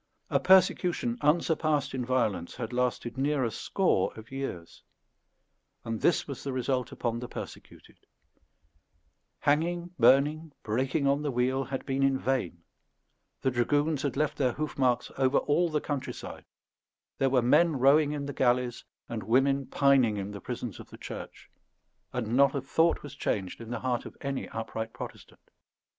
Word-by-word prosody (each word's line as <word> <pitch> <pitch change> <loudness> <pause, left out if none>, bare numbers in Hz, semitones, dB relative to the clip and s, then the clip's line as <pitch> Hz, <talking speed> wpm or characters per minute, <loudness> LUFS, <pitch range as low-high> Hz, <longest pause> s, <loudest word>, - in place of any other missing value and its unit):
A - - +3
persecution 180 -9 +3
unsurpassed 150 -2 +1
in 130 -1 -2
violence 115 -9 -1
had 120 -1 -5
lasted 125 0 -1
near 140 0 +1
a 115 - 0
score 115 - +1
of 110 +2 -12
years, 135 -11 -6 1.0
and 115 -1 -3
this 170 - +2
was 140 -3 -7
the 140 - -3
result 130 -1 -1
upon 120 -1 -2
the 125 - -6
persecuted; - - -10 1.4
hanging, 170 +4 +1
burning, 150 +3 +4
breaking 130 +6 0
on 140 +1 +2
the 150 - -1
wheel, 130 +1 0
had 135 0 -5
been 135 0 -1
in 135 -1 +3
vain; 120 -11 -2 0.8
the 130 - +1
dragoons 145 +4 +1
had 140 -2 -2
left 150 0 0
their 130 -3 +2
hoofmarks 130 -5 0
over 135 +1 +3
all 165 +4 +2
the 155 -1 0
countryside; 145 -3 -5 0.7
there 135 - +3
were 130 -2 +3
men 160 +5 +4
rowing 145 +3 +5
in 145 -1 -3
the 140 - -5
galleys, 125 -1 +1 0.2
and 115 -2 -4
women 135 +5 +2
pining 135 -6 +3
in 100 0 -4
the 100 -2 -8
prisons - - -5
of - - -11
the - - -12
Church; - - -9 0.6
and 120 -2 -2
not 140 +1 +4
a 140 - -1
thought 160 +5 +1
was 145 -2 -8
changed 100 -8 -3
in 115 - -9
the 120 -2 -4
heart 125 -2 -1
of - - -13
any 140 -1 -3
upright 110 0 -5
Protestant. - - -10
135 Hz, 160 wpm, -29 LUFS, 120-145 Hz, 1.4 s, rowing